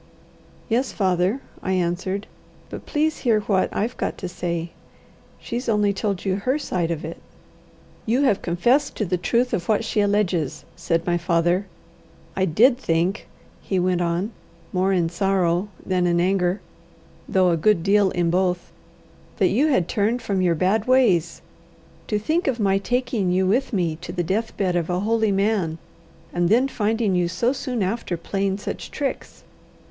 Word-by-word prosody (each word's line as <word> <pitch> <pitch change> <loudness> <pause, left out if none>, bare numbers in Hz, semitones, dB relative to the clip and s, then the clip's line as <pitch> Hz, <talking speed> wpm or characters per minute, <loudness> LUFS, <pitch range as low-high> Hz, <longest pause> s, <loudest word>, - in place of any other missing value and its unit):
"Yes, 245 +3 0
father," 190 +5 +1 0.2
I 190 - -1
answered. 185 +3 -1 0.5
"But - - -8
please 310 0 0
hear 225 -4 +2
what 195 -2 +1
I've 230 +4 -2
got - - -2
to 185 - -5
say. 170 -1 -3 0.7
She's 240 +1 -4
only 210 -2 +2
told 200 -1 -2
you 190 -1 +1
her 255 +8 0
side 180 - -2
of 160 -2 -3
it." 165 - -7 0.9
"You 245 +6 +2
have 210 -8 +2
confessed 240 +12 +1
to 215 - -1
the 180 0 -1
truth 240 +7 +1
of 175 +2 -2
what 215 +1 +2
she 215 - +1
alleges," 200 -7 0
said 165 -1 -1
my 175 -1 +1
father. 175 +3 +1 0.7
"I 190 - +2
did 240 - +4
think," 175 -1 0 0.3
he 190 - -2
went 180 0 +1
on, 175 +5 -1 0.4
more 190 +1 +2
in 175 -3 +2
sorrow 180 +1 +1 0.2
than 180 -1 +1
in 170 0 +2
anger, 185 +1 +1 0.7
though 185 -2 +3
a - - +3
good 170 +1 +2
deal 200 0 +4
in 175 -2 0
both, 180 0 0 0.7
"that 190 -3 +3
you 265 +10 +2
had 185 - +2
turned 220 +4 0
from 195 -2 0
your 175 -2 +2
bad 195 +6 +1
ways. 215 -11 +2 0.6
To 210 - 0
think 315 - 0
of 255 -3 0
my 195 -2 +2
taking 230 -4 0
you 185 +1 +2
with 245 +10 +1
me 170 -7 0
to 175 +1 -8
the 175 0 -2
death 215 +6 -2
bed 185 -3 0
of 170 -1 -1
a 180 +1 0
holy 220 0 +1
man, 195 -5 0 0.6
and 175 -1 +1
then 245 +6 +4
finding 220 -4 0
you 180 -1 +2
so 235 +9 0
soon 250 -6 -2
after 190 -2 -2
playing 195 +3 -1
such 205 - -6
tricks! 280 -2 -4
195 Hz, 170 wpm, -23 LUFS, 175-220 Hz, 0.9 s, did